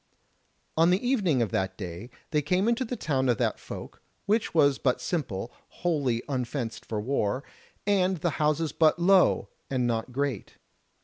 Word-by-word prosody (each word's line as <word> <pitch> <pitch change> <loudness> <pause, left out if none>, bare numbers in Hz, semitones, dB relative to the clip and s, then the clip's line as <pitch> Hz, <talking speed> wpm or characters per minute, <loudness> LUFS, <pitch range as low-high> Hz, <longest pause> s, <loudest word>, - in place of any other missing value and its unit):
On 165 +2 +5
the 190 +7 +2
evening 185 - +2
of 105 - -3
that 95 0 -1
day 90 +4 -7 0.2
they 150 -1 +2
came 180 +8 +1
into 235 +2 +2
the 250 0 -4
town 135 - 0
of 120 - +3
that - - 0
folk, - - -9 0.2
which 215 +2 +1
was 140 -4 +4
but 125 -2 +1
simple, 120 - -3 0.2
wholly 140 -9 -1
unfenced 125 -3 -3
for 110 - -2
war, 120 +1 -1 0.4
and 190 -2 +2
the 170 +1 0
houses 150 +1 +1
but 160 0 +3
low, 185 +2 +4 0.2
and 130 -2 0
not 115 +1 -1
great. 135 -4 -3
145 Hz, 165 wpm, -27 LUFS, 120-180 Hz, 0.4 s, On